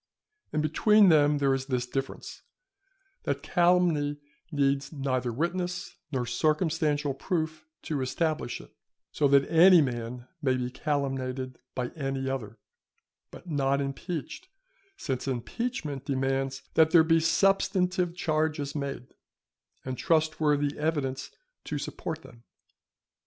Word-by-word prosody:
And 155 - 0
between 205 +6 +5
them 150 -2 +5
there 140 -1 +2
is 135 0 -2
this 125 -3 -1
difference, 135 +2 -5 0.8
that - - -2
calumny 170 -5 +2 0.3
needs 140 -2 +1
neither 130 -4 -1
witness, 175 +6 -3 0.2
nor 130 -4 -1
circumstantial 155 +1 +1
proof 155 +1 -3 0.2
to 145 -4 -2
establish 155 0 -1
it, - - -15 0.4
so 145 - +2
that 140 0 +4
any 175 +2 +7
man 120 -3 -2
may 130 -3 +2
be 125 0 -3
calumniated 130 -3 -2 0.2
by 125 -1 -2
any 135 -3 -3
other; 115 -5 -4 0.7
but 180 - -13
not 140 -3 +1
impeached; 145 - -5 0.5
since 130 - -3
impeachment 145 - -3
demands 135 0 -1
that 160 -1 +5
there 160 0 +7
be 165 0 +4
substantive 180 0 +2
charges 155 -3 -1
made, 140 -4 -5 0.7
and 130 -1 -4
trustworthy 155 -3 +1
evidence 145 -3 -1 0.4
to - - -3
support 160 -1 -5
them. 120 -1 -15
145 Hz, 120 wpm, -28 LUFS, 135-160 Hz, 0.8 s, any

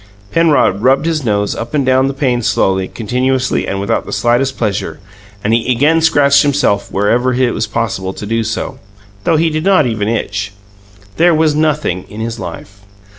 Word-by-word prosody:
Penrod 150 - +2
rubbed 135 +5 +3
his 160 -3 -1
nose 105 -3 0
up 115 +6 -5
and 140 -3 +1
down 130 +1 +3
the 135 - -2
pane 125 -4 0
slowly, 95 -3 +1
continuously, 125 +4 -1
and 95 - -2
without 100 - -1
the - - -9
slightest 120 +3 0
pleasure; 105 -4 -2 0.4
and 110 - +1
he 115 +2 +1
again 150 +7 +3
scratched 145 -3 +4
himself 140 -8 0
wherever 120 +6 +1
it 125 -1 +1
was 110 - -2
possible 105 -4 -2
to 105 - -8
do 115 +2 -1
so, 110 +1 -4 0.5
though 165 - +3
he 165 +1 +1
did 155 0 -2
not 190 -5 +4
even 110 -4 -2
itch. 105 -3 -3 0.6
There 170 0 +4
was 155 -1 +2
nothing 150 - 0
in 105 - -9
his 115 +1 -4
life. 100 -2 -9
125 Hz, 180 wpm, -15 LUFS, 105-145 Hz, 0.6 s, scratched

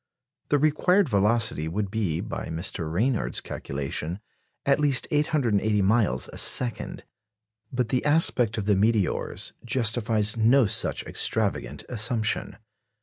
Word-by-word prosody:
The 145 - +3
required 155 +5 +2
velocity 105 -5 +1
would 95 +4 -3
be, 100 -8 -2
by - - -6
Mr. 80 -1 -4
Ranyard's 115 +8 0
calculation, 75 +6 -4 0.5
at 140 +1 +2
least 140 -4 +2
880 145 -8 +1 0.2
miles 95 - +1
a - - -5
second. 125 -2 +1 0.7
But 125 -3 -2
the 125 0 0
aspect 135 -7 +2
of 105 - -3
the 105 -1 +2
meteors 105 -2 -1
justifies 115 -3 +1
no 115 +4 +4
such 100 - +1
extravagant - - -1
assumption. 110 -1 -1
110 Hz, 120 wpm, -25 LUFS, 100-130 Hz, 0.7 s, no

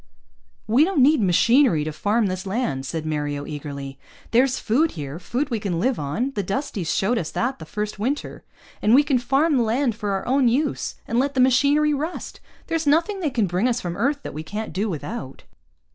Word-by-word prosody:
"We 240 +7 +4
don't 330 -6 +3
need 295 -1 +5
machinery 200 - +4
to 155 - -3
farm 210 +8 +1
this 185 0 -3
land," 190 - -2
said 160 +3 -4
Mario 145 -2 -2
eagerly. 140 -2 -7 0.3
"There's 255 +2 +3
food 285 +9 +1
here, 145 0 -6
food 260 +9 -2
we 230 - 0
can 185 -5 -2
live 255 +6 0
on; 150 - -2
the 205 - -1
Dusties 195 - -3
showed 225 +5 +1
us 160 - -4
that 255 +3 -2
the 160 - -9
first 210 +2 -4
winter. 265 +7 -3 0.4
And 220 +3 +5
we 285 - +6
can 275 -3 +1
farm 275 +5 +2
the - - +3
land 235 +2 +1
for 210 -1 -4
our 195 - -2
own 265 0 +3
use 275 +5 0
and 230 - +1
let 280 +1 0
the - - +1
machinery 285 +4 +4
rust. 310 +5 -4 0.3
There's 325 -2 -2
nothing 335 +7 +2
they 325 -5 0
can 235 -5 +1
bring 185 +6 0
us 245 -1 0
from 175 -1 -4
Earth 280 +8 0
that - - -6
we 155 - -5
can't 210 +4 -5
do 205 +5 -1
without." 160 - -6
230 Hz, 205 wpm, -23 LUFS, 175-275 Hz, 0.4 s, we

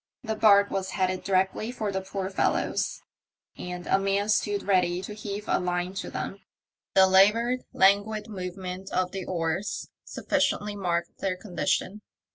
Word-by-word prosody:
The 220 -2 -2
barque 200 -2 +5
was 190 -1 -2
headed 185 -1 -1
directly 190 +4 0
for 215 -5 -3
the 190 0 -2
poor 190 0 -4
fellows, 190 - 0 0.5
and 180 0 -6
a 195 - +3
man 195 +1 0
stood 205 -1 +1
ready 180 -3 +2
to 210 - -6
heave 210 0 -6
a - - +2
line 180 0 -2
to - - -7
them. 195 - -5 0.6
The 190 - +8
laboured, 210 +7 +4
languid 205 +2 +3
movement 185 -1 -6
of 180 0 0
the 190 -2 -5
oars 170 +2 -2
sufficiently 205 0 -1
marked 175 -3 -2
their 185 -2 -1
condition. 195 +1 -2
195 Hz, 150 wpm, -27 LUFS, 185-205 Hz, 0.6 s, The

